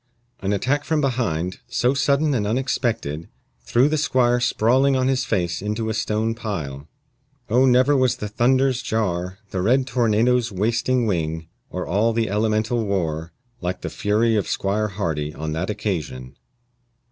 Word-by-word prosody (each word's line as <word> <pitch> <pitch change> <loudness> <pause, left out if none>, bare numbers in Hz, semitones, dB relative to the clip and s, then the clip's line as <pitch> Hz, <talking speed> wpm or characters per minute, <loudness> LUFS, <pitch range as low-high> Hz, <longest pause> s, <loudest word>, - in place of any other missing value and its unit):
An 100 +1 -2
attack 130 +8 0
from 160 0 0
behind, 115 - -1
so 125 +1 +1
sudden 140 +2 +2
and 105 -5 0
unexpected, 115 - -1 0.3
threw 120 - +3
the 155 0 0
squire 125 -4 +2
sprawling 125 +3 +3
on 130 0 +1
his 135 0 +1
face 85 -2 -1
into 105 +2 -2
a - - -1
stone 110 +2 0
pile. 80 - -5 0.6
Oh, 130 +3 +5
never 130 +3 +4
was 130 -2 +3
the 105 -4 -5
thunder's 130 +4 +2
jar, 95 -6 -2
The 95 - -2
red 125 +7 +3
tornado's 120 -1 +2
wasting 115 +5 +1
wing, 80 -4 -2 0.2
Or - - -4
all 105 +8 +1
the 110 -3 0
elemental 110 +2 +1
war, 85 -5 -2 0.3
like 90 0 -3
the - - -5
fury 110 +2 +1
of 105 - 0
Squire 105 +2 0
Hardy 80 -7 -3
on 80 +1 -4
that 80 +5 -2
occasion. 75 -12 -4
110 Hz, 155 wpm, -22 LUFS, 90-125 Hz, 0.6 s, Oh